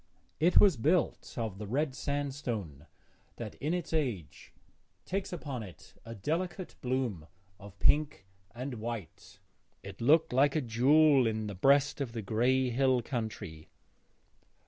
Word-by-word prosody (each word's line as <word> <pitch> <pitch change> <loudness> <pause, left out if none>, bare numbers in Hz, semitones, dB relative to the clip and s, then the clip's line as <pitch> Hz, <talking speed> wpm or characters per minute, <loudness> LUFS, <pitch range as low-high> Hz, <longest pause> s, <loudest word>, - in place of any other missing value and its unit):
It 170 +4 +5
was 190 -9 +5
built 155 +6 0
of 110 -5 -3
the 105 - -6
red 135 +5 0
sandstone 130 - -4 0.5
that - - -7
in 150 - -1
its 170 -2 -5
age 120 - -3 0.5
takes 195 +1 -3
upon 145 -8 -5
it 95 -6 -12
a 115 0 -8
delicate 175 - -3
bloom 125 -11 -2 0.3
of 100 -1 -13
pink 150 -9 +2 0.3
and 125 -1 -5
white; 110 -7 -7 0.5
it 100 +2 -10
looked 150 +4 +4
like 140 +3 +3
a 155 - +2
jewel 135 +3 +4
in 110 -1 -2
the 105 - -5
breast 140 +8 +3
of 125 -4 -3
the 115 -2 -4
grey 125 +5 +1
hill 130 0 +2
country. 110 - -5
125 Hz, 140 wpm, -31 LUFS, 110-145 Hz, 0.5 s, It